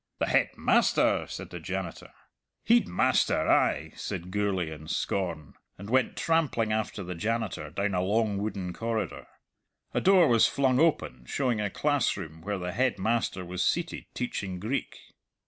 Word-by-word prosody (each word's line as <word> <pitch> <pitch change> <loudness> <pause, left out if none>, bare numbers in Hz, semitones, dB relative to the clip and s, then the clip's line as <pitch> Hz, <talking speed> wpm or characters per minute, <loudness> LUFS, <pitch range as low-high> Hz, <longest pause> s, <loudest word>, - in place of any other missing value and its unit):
"The - - +1
Headmaster!" - - +2
said - - -7
the - - -6
janitor. - - -5 0.6
"Heidmaister, 230 - +3
ay," - - +2
said 90 +2 -5
Gourlay 95 -5 0
in 80 0 -9
scorn, 85 -8 -2 0.2
and 100 +3 -8
went 130 -1 +2
trampling 150 -10 +1
after 110 -2 -2
the 90 0 -5
janitor 110 +3 -2
down 100 0 -1
a 90 - +1
long 105 +1 +1
wooden 100 -4 -3
corridor. 115 +1 -3 0.7
A - - +1
door 185 -3 +6
was 115 -2 +5
flung 130 -2 +2
open 105 - +1
showing 125 -6 0
a 105 - -1
classroom 100 - -1
where 100 +3 -3
the 90 -1 -4
Headmaster 110 -4 0
was 90 +1 -2
seated 170 0 -1
teaching 100 -7 -3
Greek. 115 +9 -3
105 Hz, 145 wpm, -28 LUFS, 90-125 Hz, 0.7 s, door